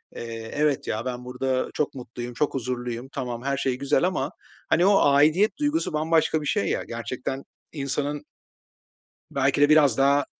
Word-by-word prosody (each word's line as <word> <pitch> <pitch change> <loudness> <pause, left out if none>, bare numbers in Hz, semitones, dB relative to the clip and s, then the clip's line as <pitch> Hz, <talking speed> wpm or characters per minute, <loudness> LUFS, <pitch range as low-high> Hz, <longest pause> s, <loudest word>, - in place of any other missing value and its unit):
eee, 115 -1 -6
evet 150 -2 +1
ya, 110 +3 -2
ben 125 -1 -4
burada 130 +1 -1
çok 150 - -1
mutluyum, 120 -1 -7
çok 145 +5 0
huzurluyum, 125 -1 -3
tamam, 125 -3 -4
her 140 0 0
şey 130 -2 0
güzel 140 +2 +1
ama, 185 +1 0 0.4
hani, 175 - +4
o 200 0 +5
aidiyet 155 +9 +4
duygusu 300 - 0
bambaşka 160 0 +2
bir - - -6
şey 100 - +1
ya - - -1
gerçekten 125 +3 -4 0.3
insanın 145 0 -2 1.1
Belki 135 +1 +1
de 145 - +6
biraz 150 -6 +5
daha 140 +1 +4
135 Hz, 160 wpm, -25 LUFS, 125-150 Hz, 1.1 s, de